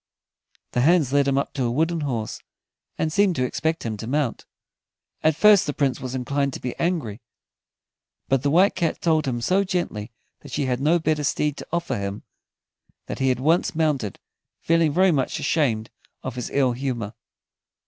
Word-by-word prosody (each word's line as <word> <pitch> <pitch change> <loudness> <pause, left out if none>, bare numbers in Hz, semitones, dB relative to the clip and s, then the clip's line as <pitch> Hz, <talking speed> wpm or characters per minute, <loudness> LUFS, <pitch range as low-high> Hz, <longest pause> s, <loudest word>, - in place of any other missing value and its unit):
The 125 - +1
hands 155 -2 +3
led 140 -1 +3
him 135 -1 +2
up 140 - -1
to 135 -3 -1
a 120 - +1
wooden 160 +6 0
horse, 120 -7 -3 0.6
and 155 -1 -1
seemed 200 -2 +3
to 130 - 0
expect 160 +6 -1
him 110 -2 -3
to 110 - -7
mount. 140 -2 -1 0.7
At 155 -1 +3
first 205 +2 +6
the 145 - -2
Prince 135 -4 0
was 130 0 -5
inclined 140 +2 -1
to - - -5
be 125 - -4
angry, 155 - -1 1.1
but 135 -2 +2
the 140 - +1
White 180 +7 +4
Cat 170 -4 -1
told 160 -4 +1
him 120 -2 -1
so 190 +10 +2
gently 175 - -3 0.3
that - - -13
she 145 - -1
had 125 -1 -1
no 155 +5 +3
better 155 -2 0
steed 150 +1 0
to - - -8
offer 170 0 -1
him, 100 +1 -4 0.8
that - - -6
he 135 0 +2
at 125 - +1
once 160 +6 +2
mounted, 150 - 0 0.4
feeling 165 -2 +2
very 185 +4 +4
much 135 -5 0
ashamed 115 -9 0 0.3
of 130 - -4
his 125 0 -5
ill 135 -3 +2
humor. 120 -4 -3
140 Hz, 185 wpm, -24 LUFS, 125-165 Hz, 1.1 s, first